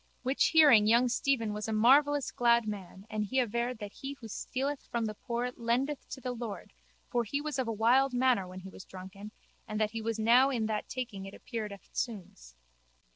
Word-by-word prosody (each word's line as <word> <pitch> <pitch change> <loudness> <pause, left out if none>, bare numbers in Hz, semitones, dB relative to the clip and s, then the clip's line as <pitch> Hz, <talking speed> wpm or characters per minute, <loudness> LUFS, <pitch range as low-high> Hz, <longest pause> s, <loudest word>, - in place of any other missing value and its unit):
Which 265 +2 +2
hearing 290 -10 +6
young 240 +3 +4
Stephen 240 -3 0
was 210 +1 -4
a - - -2
marvellous 275 +6 +4
glad 235 -2 +3
man 195 -2 -7
and 215 -1 -2
he 235 +6 -3
averred 240 +1 -1
that 205 -2 -8
he 275 +1 -6
who 245 -5 -11
stealeth 270 +6 -3
from 235 -1 -1
the 215 - -3
poor 240 +3 -3
lendeth 250 +5 -1
to 265 - -7
the 255 0 -4
Lord 235 -4 -6 0.4
for 240 -2 +1
he 260 +6 -2
was 295 -2 -3
of 255 - -1
a - - -1
wild 245 +5 +3
manner 245 -6 +2
when 185 +1 -9
he 190 - -9
was 185 - -11
drunken 190 +3 -10 0.4
and 215 0 -3
that 215 -1 +1
he 225 0 -4
was 225 0 -2
now 240 +5 +5
in 235 -5 -1
that 215 -1 -3
taking 215 -7 -5
it 195 - -10
appeared 220 -4 -5
eftsoons. 190 - -6
230 Hz, 205 wpm, -31 LUFS, 210-255 Hz, 0.4 s, hearing